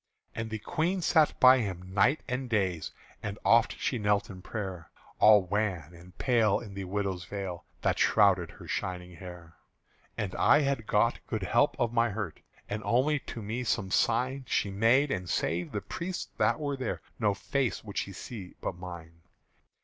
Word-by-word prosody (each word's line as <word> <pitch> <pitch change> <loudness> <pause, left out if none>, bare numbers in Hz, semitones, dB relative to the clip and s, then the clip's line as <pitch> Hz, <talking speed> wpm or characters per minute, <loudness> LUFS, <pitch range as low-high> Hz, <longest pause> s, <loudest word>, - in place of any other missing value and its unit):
And 115 0 -4
the 110 - -3
Queen 170 - -1
sat 155 -2 +3
by 130 0 +8
him 95 -4 -4
night 120 +10 +3
and 125 +1 -3
days 95 -7 0 0.3
And 105 -2 -4
oft 115 0 +4
she 125 - -1
knelt 105 -1 +1
in 95 -1 -10
prayer, 95 -5 -6 0.3
All 105 -2 +7
wan 90 -4 -2
and 85 +1 -15
pale 115 -6 +3
in 105 -5 -10
the 95 -1 -5
widow's 95 -2 -2
veil 95 -3 -5 0.2
That - - +1
shrouded 95 -5 +4
her - - -12
shining 90 -1 -4
hair. 85 -2 -11 0.6
And 100 -4 -2
I 145 - +5
had 135 -6 -1
got 115 +3 +2
good 110 -4 -3
help 120 +10 +2
of 120 -1 +1
my 120 0 +3
hurt: 105 -5 -5 0.3
And 105 +1 -3
only 140 +5 +2
to 115 -3 -8
me 115 +5 -3
some 105 -4 -1
sign 130 +4 +1
She 100 - 0
made; 120 +8 +3
and 90 -2 -3
save 85 0 -1
the 105 - -3
priests 170 - -5
that - - +3
were 145 -2 -2
there 130 -4 -3 0.2
No 105 -3 +2
face 130 +5 -1
would 100 -2 -4
she 100 - -4
see 95 0 -8
but - - -3
mine. 85 -2 -10
105 Hz, 180 wpm, -29 LUFS, 90-120 Hz, 0.6 s, by